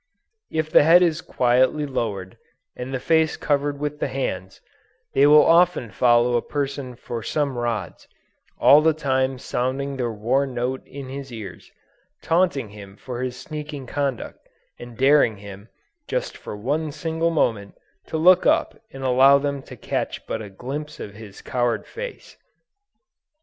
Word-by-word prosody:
If 155 -1 -2
the - - +7
head 170 +4 +6
is 165 -1 +1
quietly 130 +4 +2
lowered, 105 -9 -4 0.4
and 125 +1 -6
the 130 - -2
face 160 +2 +2
covered 145 -1 -1
with 150 0 -3
the - - -1
hands, 95 -8 -4 0.5
they 140 +1 +5
will 150 +1 +7
often 170 -9 +3
follow 120 +3 +3
a 120 - +2
person 140 -3 -4
for 115 0 -6
some 140 +4 -1
rods, 120 -4 -4 0.5
all 145 +2 +7
the 160 0 +3
time 130 -3 0
sounding 135 +3 -2
their 120 -2 -1
war 120 +6 0
note 125 +1 -3
in 135 -2 -9
his 135 0 -7
ears, 105 -7 -9 0.5
taunting 165 - +1
him 100 -1 -12
for 125 +1 -6
his 130 -1 -4
sneaking 150 -3 -7
conduct, 135 -2 -3 0.4
and 120 -1 -10
daring 135 -5 +4
him, 100 +1 -11 0.4
just - - -3
for 105 - -8
one 145 +8 -2
single 160 +2 -1
moment, 110 -11 -1 0.3
to 160 - -3
look 180 +3 +5
up - - +1
and 135 - -9
allow 130 +2 +6
them 140 0 -2
to - - -12
catch - - -3
but 110 - -4
a 105 - -8
glimpse 135 +9 -7
of 100 - -7
his 105 -1 -12
coward 120 -2 -1
face! 485 +2 -9
135 Hz, 155 wpm, -23 LUFS, 120-150 Hz, 0.5 s, the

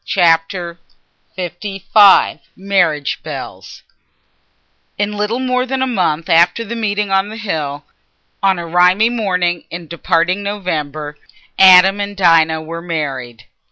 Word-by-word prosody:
Chapter 170 0 0 0.6
LV 195 +3 +2 0.2
Marriage 180 -7 0
Bells - - -9 1.1
In 205 +1 -2
little 210 +3 -2
more 255 0 -1
than 260 0 -1
a - - +1
month 175 -10 -1
after 175 +7 +3
that 230 +2 -6
meeting 210 -3 -2
on 195 +1 +1
the 220 - -8
hill—on 160 +1 -5
a 170 - -5
rimy 180 +6 +3
morning 180 -7 -1
in 170 0 -8
departing 170 +3 -1
November—Adam 180 +1 +1
and 200 0 -5
Dinah 160 -3 +3
were 165 +1 -7
married. 135 -9 -5
180 Hz, 115 wpm, -16 LUFS, 165-205 Hz, 1.1 s, after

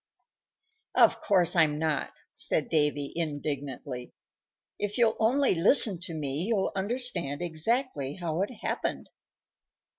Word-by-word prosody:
"Of - - +4
course 180 -4 +2
I'm 155 -3 +3
not," 155 -1 -1 0.2
said - - -1
Davy, 150 -3 0
indignantly. 145 -5 -5 0.6
"If 205 0 -3
you'll 230 -2 +3
only 255 +4 +2
listen 195 +2 +6
to 170 -4 -7
me 145 -1 -2
you'll 210 -4 0
understand 190 - -2
exactly 170 - -2
how 170 -2 -3
it 200 - -1
happened." - - -3
170 Hz, 115 wpm, -28 LUFS, 150-205 Hz, 0.6 s, listen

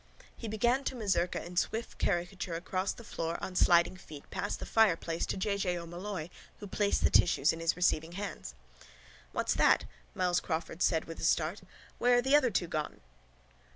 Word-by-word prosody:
He 230 - -7
began 240 +5 +1
to - - -2
mazurka 195 -8 0
in 175 +1 -9
swift 225 +6 -1
caricature 175 -1 -1
across 185 +3 -2
the 235 - -10
floor 165 -5 -3
on 185 - -6
sliding 175 0 +4
feet 150 -5 -12
past - - -2
the - - -6
fireplace 170 -6 +2
to - - -2
J. 200 +1 0
J. 180 -3 -1
O'Molloy 175 0 -5 0.3
who - - -7
placed 205 +1 0
the - - +4
tissues 160 -4 +4
in 165 - -7
his 165 0 +1
receiving 170 -2 +1
hands. 190 - -6 0.8
—What's - - 0
that? - - +4 0.3
Myles 180 -1 +2
Crawford 165 +1 -4
said 160 -2 +2
with 165 - -8
a - - -7
start. 165 +4 +1 0.4
Where 245 0 +4
are - - +4
the 270 +3 +4
other 280 -4 +5
two 190 -4 0
gone? 155 - -4
180 Hz, 185 wpm, -31 LUFS, 165-205 Hz, 0.8 s, other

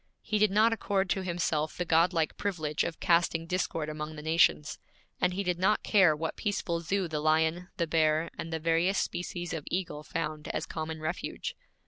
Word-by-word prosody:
He 215 - 0
did 215 0 +5
not 215 +4 +4
accord 195 -4 0
to 190 - +1
himself 170 -4 -1
the 180 - -1
godlike 165 0 +2
privilege 160 -7 -1
of 165 - -4
casting 170 -2 +2
discord 165 -3 -1
among 155 0 -5
the 150 - -8
nations, 155 - +2 0.4
and 180 - +2
he 200 - -1
did 180 -2 -1
not 205 +3 +2
care 190 -7 +5
what 160 +1 -3
peaceful 200 -5 -1
zoo 190 +2 0
the 155 -2 -2
lion, 160 +3 +2
the 170 - +1
bear, 160 0 +2
and 165 - -6
the 160 - -1
various 165 +4 +2
species 175 -1 -3
of 160 -3 -4
eagle 175 -4 -2
found 155 -1 -4
as - - -2
common 160 0 -5
refuge. 175 - -4
165 Hz, 185 wpm, -29 LUFS, 155-185 Hz, 0.4 s, did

